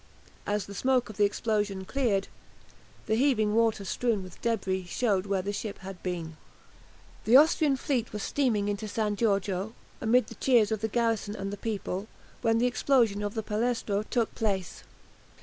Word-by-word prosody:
As 205 0 0
the 200 - -9
smoke 250 +2 +1
of 210 - -15
the 205 - +5
explosion 205 -2 -1
cleared, 215 -5 0 0.8
the 215 - 0
heaving 220 -4 +2
water 225 -3 +2
strewn 225 -1 0
with 185 -2 -12
debris 190 -5 -1
showed 200 0 0
where 195 -2 0
the 205 +1 -3
ship 205 0 -4
had 190 -1 -8
been. 170 -3 -4 0.9
The 235 +4 +8
Austrian 300 -1 +4
fleet 250 -3 -1
was 210 -2 -4
steaming 230 -8 +1
into 205 +1 -2
San 210 0 -1
Giorgio, 200 -1 0 0.3
amid 245 +2 +3
the - - -10
cheers 235 -6 +3
of 220 -2 -1
the 220 - 0
garrison 225 -2 0
and 195 0 -4
the - - -2
people, 200 -2 -4 0.3
when 225 -1 +2
the 235 - +2
explosion 245 -4 +2
of 205 +1 -3
the 220 - -2
"Palestro" 215 -1 -1
took 235 -3 0
place. 195 -5 -2
215 Hz, 170 wpm, -28 LUFS, 200-235 Hz, 0.9 s, The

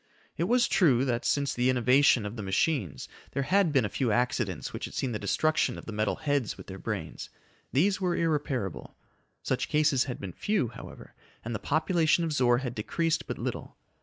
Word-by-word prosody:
It 170 - 0
was 240 +4 +3
true 135 - +3
that, 120 -2 -1
since 140 -1 +1
the 125 +1 +1
innovation 125 -1 +4
of 105 +2 -5
the 110 - -5
machines, 95 - -1 0.3
there 140 - 0
had 190 +2 +3
been 135 -5 +3
a 105 - -6
few 125 -4 +1
accidents 105 - -1
which - - -4
had - - -9
seen 130 - -1
the 105 - -3
destruction 155 +5 +1
of - - -10
the - - -6
metal 105 0 0
heads 145 -6 -1
with - - -10
their 95 0 -9
brains. - - -5 0.4
These 190 +8 +2
were 180 -2 +1
irreparable. 140 - -2 0.5
Such - - -1
cases 150 -4 +3
had 125 -3 -5
been 95 -3 -6
few, 200 - 0
however, 120 - -11 0.3
and 120 - -3
the 105 - -3
population 160 +2 +2
of 160 -2 -1
Zor 120 -4 +3
had 125 -2 -3
decreased 165 +9 -1
but - - -4
little. - - -5
130 Hz, 195 wpm, -28 LUFS, 115-155 Hz, 0.5 s, innovation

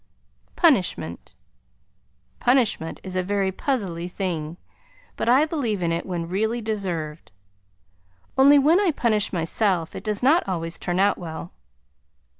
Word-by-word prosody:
PUNISHMENT 180 - +1 1.0
Punishment 240 -10 +1
is 185 -1 -5
a 185 - +2
very 195 0 0
puzzly 185 -8 -2
thing, 170 -4 -4 0.6
but - - -1
I 265 +5 +5
believe 240 - -2
in 170 - +1
it 170 +2 -2
when 175 -3 -3
really 220 +6 -1
deserved, 180 - -4 1.0
only 280 +2 +7
when 305 +6 +5
I 405 -3 +2
punish 225 -8 +1
myself 175 0 0
it - - -7
does 210 +1 -2
not 285 - +3
always 165 -2 -3
turn 175 +1 -2
out 200 +1 +3
well. 165 0 -7
195 Hz, 130 wpm, -24 LUFS, 170-240 Hz, 1.0 s, only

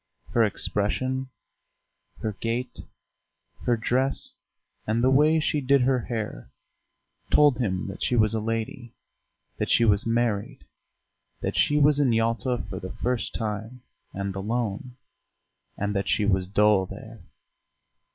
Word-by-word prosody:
Her 120 - +3
expression, 130 +6 -1 0.9
her 110 - -1
gait, 120 +2 -3 0.9
her 120 -1 +2
dress, 130 +4 -1 0.5
and 115 +2 +1
the 130 - +4
way 150 +4 +4
she 150 -1 0
did 135 0 +3
her 130 0 +3
hair 110 - -5 0.8
told 145 -5 +5
him 95 -6 -1
that 100 - -8
she 125 - +1
was 110 -2 +3
a 110 - 0
lady, 115 +2 -4 0.6
that - - -1
she 115 - +4
was 100 0 +3
married, 120 +2 -1 0.8
that - - -2
she 145 - +3
was 145 0 +4
in 130 -5 +3
Yalta 115 +2 0
for 95 - -5
the 95 - -7
first 125 -1 -2
time 110 +3 -4 0.3
and 100 0 -4
alone, 115 +3 -3 0.8
and 105 +1 -1
that 100 - -1
she 105 - +2
was 95 -2 +1
dull 100 -1 +3
there.... - - -10
115 Hz, 135 wpm, -26 LUFS, 105-130 Hz, 0.9 s, told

